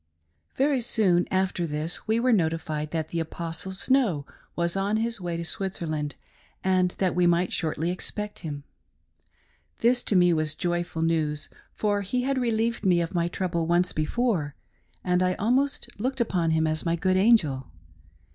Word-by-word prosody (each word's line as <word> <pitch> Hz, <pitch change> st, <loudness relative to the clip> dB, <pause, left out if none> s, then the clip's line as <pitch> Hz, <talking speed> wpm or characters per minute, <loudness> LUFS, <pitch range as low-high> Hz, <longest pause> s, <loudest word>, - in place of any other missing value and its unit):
VERY 275 Hz, -1 st, +2 dB
soon 200 Hz, -7 st, +2 dB
after 185 Hz, -2 st, 0 dB
this 155 Hz, +6 st, -3 dB
we 220 Hz, +1 st, +2 dB
were 250 Hz, +1 st, +3 dB
notified 160 Hz, -4 st, 0 dB
that 160 Hz, -1 st, -3 dB
the 170 Hz, -, -2 dB
Apostle 165 Hz, +3 st, -3 dB
Snow 190 Hz, -, +1 dB, 0.3 s
was 170 Hz, +1 st, 0 dB
on 200 Hz, +2 st, +1 dB
his 230 Hz, -1 st, -1 dB
way 175 Hz, -1 st, -3 dB
to 170 Hz, -, -3 dB
Switzerland, 160 Hz, -6 st, -2 dB, 0.5 s
and 185 Hz, -1 st, +2 dB
that 185 Hz, -2 st, +1 dB
we 175 Hz, 0 st, +3 dB
might 175 Hz, +1 st, +2 dB
shortly 160 Hz, +1 st, 0 dB
expect 210 Hz, +3 st, -4 dB
him. 145 Hz, -3 st, -6 dB, 1.2 s
This 245 Hz, +1 st, +3 dB
to 205 Hz, -, +1 dB
me 175 Hz, -1 st, +5 dB
was 155 Hz, -1 st, 0 dB
joyful 175 Hz, -2 st, -2 dB
news, 155 Hz, -3 st, 0 dB, 0.3 s
for 205 Hz, -1 st, 0 dB
he 250 Hz, +6 st, -1 dB
had 270 Hz, 0 st, 0 dB
relieved 230 Hz, -2 st, 0 dB
me 180 Hz, -3 st, +4 dB
of 170 Hz, +2 st, -2 dB
my 170 Hz, -1 st, +1 dB
trouble 170 Hz, -2 st, -2 dB
once 175 Hz, +1 st, +2 dB
before, 155 Hz, -, 0 dB, 0.5 s
and 180 Hz, 0 st, +2 dB
I 185 Hz, 0 st, +2 dB
almost 260 Hz, +6 st, +1 dB
looked 260 Hz, +4 st, -2 dB
upon 180 Hz, -8 st, +1 dB
him 160 Hz, 0 st, +2 dB
as 155 Hz, 0 st, -1 dB
my 170 Hz, -1 st, +1 dB
good 185 Hz, +2 st, +1 dB
angel. 185 Hz, -, +3 dB
180 Hz, 165 wpm, -26 LUFS, 165-210 Hz, 1.2 s, me